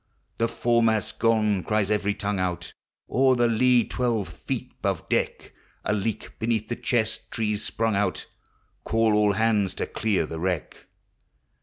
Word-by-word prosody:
The 115 - +3
foremast 115 -2 +2
's - - -5
gone, 110 -4 +2
cries 105 -2 0
every 105 -1 +1
tongue 100 -1 -2
out, 90 -1 -2 0.3
O'er 130 +1 +3
the 120 -1 +3
lee 120 +1 +4
twelve 115 -5 -1
feet - - -5
'hove - - -1
deck; - - -1 0.3
A - - +1
leak 105 +1 -3
beneath 110 -1 -1
the 120 - -1
chest 120 -2 -1
tree 110 -2 -1
s 105 - -3
sprung 115 -2 -1
out, 100 -2 0 0.6
Call 115 -1 +2
all 105 -1 +3
hands 105 -2 +1
to - - -2
clear 105 -7 0
the 80 +1 -6
wreck. 90 -2 -3
110 Hz, 160 wpm, -25 LUFS, 100-115 Hz, 0.6 s, lee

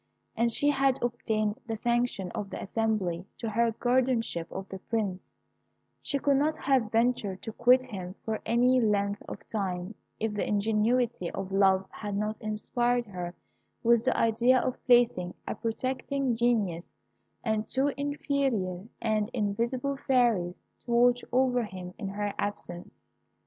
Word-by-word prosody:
As 235 +1 +2
she 290 +5 +3
had 270 -2 +2
obtained 215 -2 -1
the 225 -1 -2
sanction 235 -5 0
of 200 - -4
the - - -6
assembly 195 -5 -1
to 225 -2 -3
her 230 +2 +2
guardianship 240 -8 0
of 190 0 -6
the 190 - -6
Prince, 200 -4 -3 0.7
she 280 - -1
could 280 0 +2
not 305 +3 +1
have 260 -6 +1
ventured 225 -4 +1
to 220 - -4
quit 250 +2 +5
him 190 -6 -7
for 220 -1 -1
any 250 +2 +3
length 205 -2 +1
of - - -9
time 190 -2 -3 0.3
if 220 -1 -1
the 205 - -1
ingenuity 220 0 +1
of 195 0 -5
love 190 -1 +4
had 205 -2 -4
not 210 +1 -1
inspired 240 +3 0
her 180 -4 -6 0.5
with 235 -1 +4
the 260 - +1
idea 235 +3 +4
of 255 - -3
placing 235 -8 +4
a - - -1
protecting 255 +3 -1
genius 215 -8 0 0.5
and 220 -1 -1
two 270 +2 +2
inferior 270 -10 -1 0.2
and 215 -1 +1
invisible 240 +5 -1
fairies 230 -9 +2 0.2
to 240 - -6
watch 245 +1 +4
over 250 -1 +3
him 185 -4 -7
in 205 - -3
her 205 +1 -2
absence. 175 -4 -4
225 Hz, 150 wpm, -29 LUFS, 200-245 Hz, 0.7 s, quit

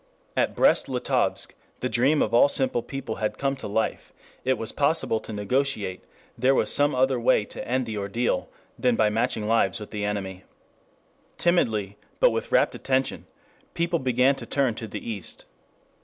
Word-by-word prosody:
At - - +1
Brest - - +3
Litovsk - - -1 0.3
the 125 - 0
dream 135 +5 +3
of 110 - -3
all 120 +4 +6
simple 130 -3 +1
people 135 -3 -6
had 110 -1 -2
come 135 0 0
to 130 - -6
life: 110 +2 -2 0.3
it 130 +1 +1
was 115 - -1
possible 140 -6 +1
to - - -10
negotiate, 105 -2 -1 0.3
there 130 +3 +3
was - - +2
some 145 0 +3
other 130 0 +2
way 115 -3 +3
to - - -8
end 130 +1 0
the 110 -2 -4
ordeal 100 +5 -1 0.3
than 125 -2 +2
by 110 -1 +3
matching 110 -1 0
lives 110 -4 +2
with 105 - -9
the 105 -1 -3
enemy. 95 -2 -3 0.9
Timidly, 110 - +1 0.2
but - - +5
with - - -3
rapt - - +3
attention, 130 0 -1 0.5
people 170 0 0
began 130 +1 +3
to - - -8
turn 135 -4 +1
to 110 0 -6
the 105 - -7
East. 105 -6 -6
120 Hz, 170 wpm, -25 LUFS, 105-135 Hz, 0.9 s, all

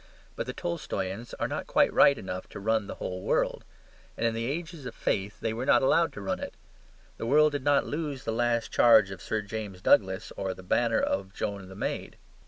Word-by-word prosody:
But - - -4
the - - -3
Tolstoyans 120 - -4
are - - 0
not - - -4
quite - - +3
right 140 - +6
enough 90 0 -6
to - - -8
run 110 0 0
the - - -6
whole 90 0 -5
world; - - 0 0.5
and 115 - -1
in 115 - +2
the 115 +1 -2
ages 160 -2 -5
of 115 - -8
faith 100 +1 -2
they 110 - -1
were 115 +3 -3
not - - +5
allowed 165 +5 +3
to 100 - -7
run 100 - -2
it. - - -6 0.6
The 115 - -4
world 150 +4 +5
did 145 -2 -3
not 145 0 +3
lose 150 -3 -4
the 115 - -2
last 120 0 0
charge 110 -5 +6
of 95 - -8
Sir 110 -1 -2
James 105 -3 -6
Douglas 95 0 +2
or 95 -1 -3
the 95 - -12
banner 115 +5 +2
of 95 0 -2
Joan 100 -2 -4
the 95 - -10
Maid. 100 - -4
115 Hz, 215 wpm, -28 LUFS, 95-135 Hz, 0.6 s, right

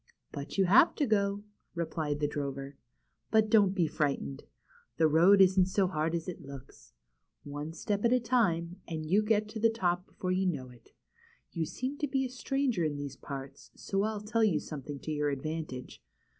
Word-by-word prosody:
^^But 140 +6 -6
you 195 - +4
have 215 - +6
to 295 - +1
go," 200 -3 +1 0.3
replied 155 -3 -2
the 145 - +2
drover. 140 -1 -4 0.6
^^But 220 -1 +3
don't 200 -3 +5
be 175 -4 +3
frightened. 145 -2 -2 0.5
The 160 - +5
road 175 +6 +6
isn't 185 -1 +5
so 190 +1 +2
hard 160 -2 -1
as 165 -1 -4
it 180 -1 -6
looks. 135 -2 -12 0.5
One 145 +2 -6
step 205 +4 -2
at 235 - +3
a 250 - +4
time, 190 -8 +1
and 160 -2 -4
you 190 +7 +3
get 215 0 +1
to 220 - -6
the 230 +1 +4
top 180 -4 -1
before 185 - -4
you 185 +1 +1
know 130 -7 -3
it. 120 -1 -19 0.6
You 165 -3 -2
seem 265 +3 -4
to 295 - 0
be 265 -1 0
a - - -4
stranger 255 -5 -1
in 150 -2 0
these 145 -1 -5
parts, 135 0 -8
so 195 0 -2
I'll 215 0 -1
tell 225 +2 0
you 185 -8 +3
something 145 -1 -7
to 155 - -5
your 150 -1 0
advantage. 145 -2 -5
175 Hz, 190 wpm, -31 LUFS, 150-210 Hz, 0.6 s, have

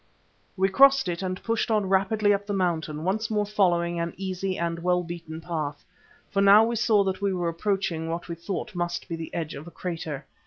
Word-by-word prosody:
We 190 +1 +3
crossed 270 +4 +5
it 175 0 -2
and 185 0 -4
pushed 230 0 0
on 210 -3 +2
rapidly 205 +2 +3
up 200 0 -2
the 205 - -1
mountain, 160 -5 -1
once 210 +5 -1
more 210 -1 +1
following 175 -4 +1
an 170 0 -3
easy 190 0 -3
and 170 0 -2
well 180 +1 +1
beaten 165 -2 -7
path, 155 -4 -4 0.5
for 195 - +1
now 200 +2 +8
we 235 +1 0
saw 220 -3 +3
that 190 0 -2
we 200 -1 +1
were 175 -2 -1
approaching 170 -2 -1
what 170 +1 -4
we 170 - -4
thought 170 +4 -5
must 175 -1 -3
be 165 - -3
the 165 -1 -7
edge 165 -2 -3
of 145 +4 -9
a - - -9
crater. 160 -6 -5
180 Hz, 210 wpm, -26 LUFS, 170-200 Hz, 0.5 s, now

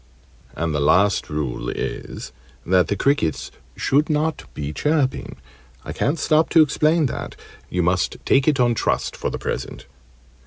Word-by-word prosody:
And 80 0 -2
the 75 - 0
last 95 +7 +3
rule 75 -5 -3
is, - - -5 0.3
that 90 0 +3
the 100 - 0
crickets 135 - 0 0.2
should 145 +4 +1
not 155 +1 0
be 75 0 -4
chirping. 150 - 0 0.5
I - - -5
can't 150 +4 0
stop 155 +1 +2
to 165 -2 +6
explain 155 +2 +2
that: 130 - -4 0.3
you 90 0 0
must 90 0 0
take 135 +1 +3
it 145 -3 +3
on 120 -1 +4
trust - - -1
for - - -3
the - - -4
present. - - -5
130 Hz, 155 wpm, -22 LUFS, -, 0.5 s, to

